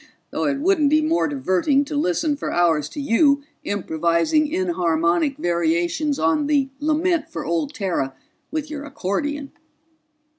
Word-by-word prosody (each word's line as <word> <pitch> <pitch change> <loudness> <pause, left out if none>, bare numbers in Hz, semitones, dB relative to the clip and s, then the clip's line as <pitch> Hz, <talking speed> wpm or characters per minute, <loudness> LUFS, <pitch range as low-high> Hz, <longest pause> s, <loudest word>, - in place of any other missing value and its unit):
Though - - -1
it 280 -1 +1
wouldn't 310 -1 +2
be 310 +1 +3
more 325 +2 +2
diverting 275 - +1
to 295 - -5
listen 290 - +1
for 285 - -4
hours 165 -4 +2
to - - -8
you 280 +2 +3 0.2
improvising 170 - +1
enharmonic 265 - +1
variations 175 - 0
on 225 - +1
the 280 -3 +2
Lament 315 +2 +1
for 330 - -5
Old 305 -3 -1
Terra 175 - -2 0.3
with 310 -1 -3
your 290 -2 -5
accordion." 285 +2 -3
285 Hz, 140 wpm, -22 LUFS, -, 0.3 s, be